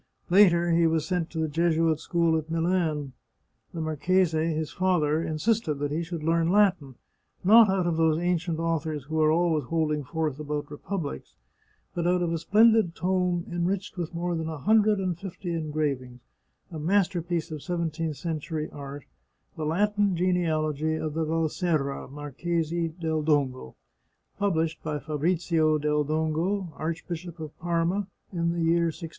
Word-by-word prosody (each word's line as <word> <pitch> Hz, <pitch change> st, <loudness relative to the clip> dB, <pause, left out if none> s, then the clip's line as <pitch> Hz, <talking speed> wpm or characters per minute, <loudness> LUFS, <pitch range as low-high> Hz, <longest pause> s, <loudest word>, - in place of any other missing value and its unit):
Later 175 Hz, -3 st, +5 dB
he 165 Hz, 0 st, +4 dB
was 160 Hz, -1 st, +1 dB
sent 175 Hz, -1 st, -1 dB
to 165 Hz, -, -8 dB
the 160 Hz, 0 st, +1 dB
Jesuit 165 Hz, 0 st, +1 dB
school 170 Hz, -1 st, +1 dB
at 160 Hz, 0 st, -2 dB
Milan. 165 Hz, -4 st, 0 dB, 0.6 s
The 165 Hz, -, -5 dB
marchese, 160 Hz, +1 st, +1 dB
his 155 Hz, -1 st, -3 dB
father, 160 Hz, -5 st, +1 dB
insisted 165 Hz, +2 st, 0 dB
that 145 Hz, 0 st, -3 dB
he 155 Hz, +3 st, -1 dB
should 170 Hz, -2 st, -5 dB
learn 165 Hz, +1 st, +2 dB
Latin, 185 Hz, -10 st, +2 dB, 0.5 s
not 220 Hz, +3 st, +7 dB
out 190 Hz, -2 st, +1 dB
of 170 Hz, -2 st, 0 dB
those 160 Hz, -1 st, +3 dB
ancient 175 Hz, -1 st, 0 dB
authors 160 Hz, -3 st, -2 dB
who 155 Hz, +3 st, -1 dB
are 155 Hz, 0 st, +4 dB
always 160 Hz, -3 st, +2 dB
holding 150 Hz, +1 st, 0 dB
forth 155 Hz, +1 st, -2 dB
about 150 Hz, -1 st, -4 dB
republics, 150 Hz, -, -5 dB, 0.6 s
but 170 Hz, -1 st, -1 dB
out 180 Hz, 0 st, +2 dB
of 170 Hz, -1 st, -1 dB
a 165 Hz, -, -1 dB
splendid 215 Hz, 0 st, +4 dB
tome 180 Hz, -1 st, 0 dB
enriched 180 Hz, +3 st, -2 dB
with 175 Hz, -3 st, -4 dB
more 175 Hz, +1 st, -1 dB
than 160 Hz, 0 st, -3 dB
a 160 Hz, -, -5 dB
hundred 215 Hz, +5 st, +3 dB
and 180 Hz, -3 st, -2 dB
fifty 185 Hz, -2 st, -5 dB
engravings, 145 Hz, -6 st, -2 dB, 0.5 s
a 160 Hz, -, -6 dB
masterpiece 175 Hz, -1 st, 0 dB
of 155 Hz, -2 st, -5 dB
seventeenth 165 Hz, -3 st, -2 dB
century 155 Hz, 0 st, -4 dB
art, 140 Hz, 0 st, -8 dB, 0.5 s
the 160 Hz, -2 st, -4 dB
Latin 205 Hz, +3 st, +1 dB
Genealogy 160 Hz, -4 st, 0 dB
of 155 Hz, -1 st, -3 dB
the 160 Hz, +1 st, -1 dB
Valserra, 160 Hz, -2 st, -1 dB
Marchesi 165 Hz, +4 st, -2 dB
del 160 Hz, -2 st, -1 dB
Dongo, 140 Hz, -, 0 dB, 0.6 s
published 165 Hz, -5 st, 0 dB
by 155 Hz, -1 st, -3 dB
Fabrizio 155 Hz, +1 st, +1 dB
del 150 Hz, 0 st, +1 dB
Dongo, 160 Hz, +4 st, -1 dB
Archbishop 165 Hz, +1 st, -5 dB
of 155 Hz, -2 st, -7 dB
Parma, 175 Hz, +3 st, 0 dB, 0.3 s
in 170 Hz, -1 st, 0 dB
the 170 Hz, -1 st, -1 dB
year 170 Hz, +1 st, +3 dB
1650. 165 Hz, +1 st, -7 dB
165 Hz, 155 wpm, -27 LUFS, 155-175 Hz, 0.6 s, not